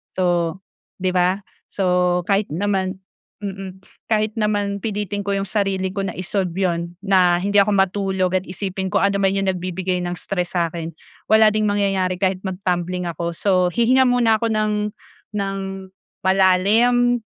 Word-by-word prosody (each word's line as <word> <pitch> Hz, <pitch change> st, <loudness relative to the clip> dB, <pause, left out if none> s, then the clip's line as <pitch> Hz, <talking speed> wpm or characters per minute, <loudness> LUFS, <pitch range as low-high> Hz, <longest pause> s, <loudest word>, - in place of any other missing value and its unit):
so 175 Hz, -2 st, +1 dB, 0.5 s
'di 185 Hz, 0 st, +1 dB
ba? 180 Hz, +2 st, +2 dB, 0.3 s
So 180 Hz, -2 st, +1 dB
kahit 200 Hz, 0 st, +2 dB
naman 190 Hz, +2 st, -1 dB, 0.5 s
mm 195 Hz, -1 st, -6 dB, 0.3 s
kahit 215 Hz, -1 st, +1 dB
naman 205 Hz, -1 st, 0 dB
pilitin 205 Hz, -1 st, -3 dB
ko -, -, -3 dB
'yong 195 Hz, -, -1 dB
sarili 190 Hz, -2 st, -1 dB
ko 200 Hz, -, -2 dB
na -, -, -2 dB
i-solve 185 Hz, -1 st, -2 dB
'yon, 170 Hz, -2 st, -1 dB
na 185 Hz, -3 st, +4 dB
hindi 200 Hz, +2 st, +3 dB
ako 200 Hz, -, +1 dB
matulog 190 Hz, -1 st, +1 dB
at -, -, -2 dB
isipin 190 Hz, 0 st, -3 dB
kung 200 Hz, 0 st, +1 dB
ano 200 Hz, 0 st, +1 dB
man 195 Hz, -, +4 dB
'yong 195 Hz, -1 st, 0 dB
nagbibigay 180 Hz, 0 st, -2 dB
ng 175 Hz, 0 st, -3 dB
stress 180 Hz, -2 st, -3 dB
sa 170 Hz, -1 st, +1 dB
akin, 165 Hz, -1 st, -4 dB, 0.4 s
wala 220 Hz, 0 st, +6 dB
ding 215 Hz, 0 st, +1 dB
mangyayari 195 Hz, -3 st, 0 dB
kahit 190 Hz, -1 st, +1 dB
mag-tumbling 180 Hz, -1 st, -2 dB
ako. 170 Hz, +1 st, -3 dB
So 185 Hz, -3 st, +2 dB
hihinga 255 Hz, +3 st, +4 dB
muna 235 Hz, -3 st, +3 dB
ako 230 Hz, -, +1 dB
ng 210 Hz, -1 st, 0 dB, 0.5 s
ng 195 Hz, -1 st, -2 dB, 0.7 s
malalim, 215 Hz, +6 st, +4 dB
195 Hz, 155 wpm, -21 LUFS, 180-205 Hz, 0.7 s, wala